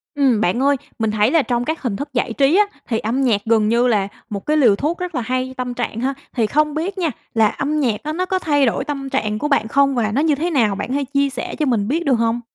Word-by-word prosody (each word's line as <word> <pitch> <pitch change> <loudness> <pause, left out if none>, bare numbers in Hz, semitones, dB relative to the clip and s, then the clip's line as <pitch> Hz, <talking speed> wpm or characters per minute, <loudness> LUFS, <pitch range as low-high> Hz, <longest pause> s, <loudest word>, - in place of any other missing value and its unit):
Ừm, 260 -6 +2
bạn 190 +3 +1
ơi 280 +1 +3 0.2
mình 220 -1 0
thấy 215 +3 +2
là 325 - +4
trong 245 -2 -1
các 315 +3 -3
hình 240 -7 -2
thức 285 +5 -6
giải 245 -1 -1
trí 275 +6 +3
á, 420 - +5 0.2
thì 225 -2 0
âm 235 +5 -1
nhạc 230 -6 +2
gần 220 -2 +3
như 235 +2 +3
là 205 -5 +1 0.2
một 200 -3 -5
cái 305 +1 +2
liều 240 -9 +5
thuốc 305 +10 -2
rất 360 -2 -4
là 250 - 0
hay 255 +2 -2
tâm 250 -1 -3
trạng 240 -2 -3
ha. 270 +2 0 0.2
Thì 230 -4 +1
không 300 +4 +1
biết 360 +6 -3
nha, 335 -4 0 0.2
là 225 -1 +4
âm 295 +7 -2
nhạc 235 -7 0
đó 305 - -3
nó 365 +3 -1
có 375 0 -1
thay 290 -5 +2
đổi 240 +2 0
tâm 275 -2 -4
trạng 215 -6 -1
của 295 - -1
bạn 280 -6 +1
không 275 +3 +2
và 220 -3 0
nó 265 +7 +1
như 310 -2 +2
thế 325 +5 -1
nào? 230 - +2
Bạn 205 - -4
có 255 - -4
thể 285 +1 0
chia 280 0 +2
sẻ 270 - -5
cho 305 - +2
mình 225 -7 +1
biết 325 +7 -1
được 275 - +3
hông? 230 0 +1
260 Hz, 290 wpm, -20 LUFS, 225-295 Hz, 0.2 s, á